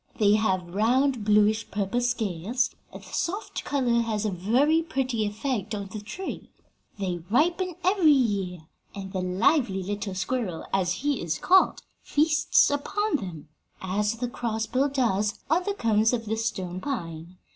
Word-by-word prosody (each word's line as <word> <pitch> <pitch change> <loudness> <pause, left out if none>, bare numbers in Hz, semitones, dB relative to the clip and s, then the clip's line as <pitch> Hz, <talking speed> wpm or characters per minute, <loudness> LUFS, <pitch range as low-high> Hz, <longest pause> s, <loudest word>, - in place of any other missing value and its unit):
They 205 -1 +4
have 185 -5 0
round, 245 +4 +2
bluish 210 +1 +3
purple 205 +4 -1
scales, 235 -1 -1 0.2
and - - -10
the - - -13
soft 395 +6 -3
color 245 -5 +1
has 220 -2 -2
a 210 - 0
very 250 - +2
pretty 255 -8 -1
effect 215 -1 -3
on 200 -1 -5
the 215 - -5
tree. 370 - -7 0.5
They 185 -3 -2
ripen 340 - +1
every 370 -3 +4
year, 200 - +1 0.3
and 195 -1 -7
the 185 - -1
lively 195 - +2
little 205 0 -4
squirrel, 195 -4 -2
as 185 -2 +2
he 290 -4 +1
is 160 -2 -2
called, 375 - +3 0.2
feasts 305 0 +3
upon 400 +7 0
them, 170 - -8 0.3
as 205 +4 -1
the 245 +2 -3
crossbill 235 +3 -1
does 220 -6 +1 0.2
on 355 +3 +2
the 405 - -1
cones 225 - +2
of 230 -2 -1
the 220 +1 -1
stone 185 -5 -3
pine. 170 - -5
220 Hz, 155 wpm, -26 LUFS, 195-270 Hz, 0.5 s, They